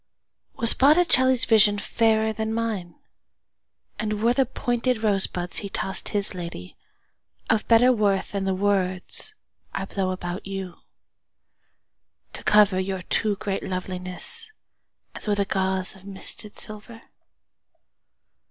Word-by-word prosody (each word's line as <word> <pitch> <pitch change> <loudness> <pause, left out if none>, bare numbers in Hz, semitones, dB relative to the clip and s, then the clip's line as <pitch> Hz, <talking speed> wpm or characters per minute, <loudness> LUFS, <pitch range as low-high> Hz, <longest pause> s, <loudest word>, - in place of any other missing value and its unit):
Was 230 - +7
Botticelli's 265 -4 +4
visionFairer 220 +1 +3
than 220 +1 -3
mine; 215 -7 -3 1.0
And 215 -1 -2
were 235 +1 +4
the 265 -1 +1
pointed 245 0 -1
rosebudsHe 195 -1 0
tossed 190 - -2
his 205 -1 +2
ladyOf 175 - -7
better 240 +2 +5
worthThan 200 -3 0
the 190 -1 0
words 190 - -1 0.4
I 195 - -2
blow 195 -1 -2
about 180 0 -5
youTo 195 -2 -5 1.7
cover 205 -3 +4
your 190 -1 -3
too 210 +2 0
great 195 -1 -3
lovelinessAs 185 - -2 0.8
with 205 -1 +1
a 200 - +2
gauzeOf 190 0 -2
misted 200 +2 -4
silver? 215 +2 -8
205 Hz, 100 wpm, -24 LUFS, 190-225 Hz, 1.7 s, Was